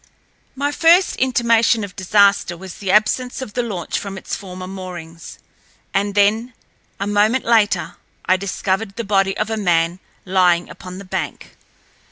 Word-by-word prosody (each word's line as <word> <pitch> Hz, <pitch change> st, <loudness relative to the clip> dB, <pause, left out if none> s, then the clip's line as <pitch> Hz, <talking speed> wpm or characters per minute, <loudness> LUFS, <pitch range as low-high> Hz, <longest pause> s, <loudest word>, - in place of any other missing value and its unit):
My 285 Hz, +2 st, -1 dB
first 340 Hz, +5 st, +4 dB
intimation 235 Hz, -3 st, +2 dB
of 195 Hz, -3 st, -8 dB
disaster 200 Hz, -2 st, +3 dB
was 190 Hz, 0 st, -10 dB
the 195 Hz, -, -4 dB
absence 215 Hz, +5 st, +2 dB
of 260 Hz, -6 st, -7 dB
the 245 Hz, -, 0 dB
launch 195 Hz, -8 st, -3 dB
from 195 Hz, -1 st, -7 dB
its -, -, -5 dB
former 185 Hz, -1 st, -8 dB
moorings. 175 Hz, -4 st, -9 dB, 0.6 s
And 200 Hz, +1 st, 0 dB
then, 220 Hz, +4 st, +2 dB, 0.4 s
a 200 Hz, -, -1 dB
moment 210 Hz, +5 st, +2 dB
later—I 205 Hz, -4 st, 0 dB
discovered 195 Hz, +1 st, -2 dB
the 235 Hz, -, -3 dB
body 195 Hz, -2 st, +1 dB
of 215 Hz, +1 st, -2 dB
a 220 Hz, -, -1 dB
man 175 Hz, -3 st, +1 dB, 0.3 s
lying 180 Hz, -2 st, +2 dB
upon 185 Hz, 0 st, -9 dB
the 200 Hz, -, -9 dB
bank. 185 Hz, -, -5 dB
200 Hz, 150 wpm, -19 LUFS, 185-225 Hz, 0.6 s, first